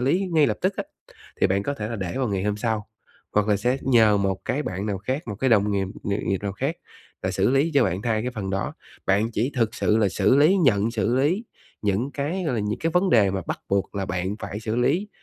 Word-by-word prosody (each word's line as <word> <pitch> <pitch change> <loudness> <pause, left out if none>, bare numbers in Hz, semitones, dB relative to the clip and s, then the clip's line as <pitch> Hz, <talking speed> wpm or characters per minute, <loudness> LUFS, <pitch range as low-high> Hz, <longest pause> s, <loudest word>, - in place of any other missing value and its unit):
lý 175 +10 +1
ngay 155 -3 +5
lập - - 0
tức 185 +1 0
á, - - -2 0.6
thì - - +5
bạn 100 +1 +1
có 140 - -2
thể 105 -5 -4
là 115 - -4
để 95 -3 -4
vào 130 -4 0
ngày 95 -2 -1
hôm 105 0 0
sau, 110 -1 -2 0.4
hoặc 105 0 +2
là 105 - +4
sẽ 125 +6 +1
nhờ 110 -5 +5
một 95 -1 0
cái 145 +4 -1
bạn 95 0 -4
nào 100 -2 -2
khác, 130 - -3
một 105 - -3
cái 130 +5 0
đồng 105 -2 +4
nghiệp 95 -1 0 0.2
nghiệp 100 0 -1
nghiệp 95 - +1
nào 100 - -2
khác 135 - -2 0.5
là - - 0
xử - - +1
lý 140 +5 +2
cho 135 -4 +5
bạn 95 +1 -1
thay 110 -2 0
cái 125 - -2
phần 105 -5 -4
đó. 95 0 -2 0.3
Bạn 105 +4 +2
chỉ 120 +7 -1
thực 115 -2 +1
sự 110 - +2
là 105 -3 +3
xử 105 +7 +3
lý, 155 +7 +5
nhận 115 - +3
xử 115 +1 0
lý 170 - +1 0.4
những 105 +7 0
cái, 155 +7 -2
gọi 125 - 0
là, 110 - 0
những 105 +1 -2
cái 165 - 0
vấn 185 +1 +2
đề 100 -5 +5
mà 95 - -2
bắt - - -3
buộc 100 +1 0
là 95 -1 -2
bạn 95 +4 -2
phải 105 - -5
xử 110 0 -2
lý, 180 +12 +1
110 Hz, 265 wpm, -24 LUFS, 100-135 Hz, 0.6 s, ngay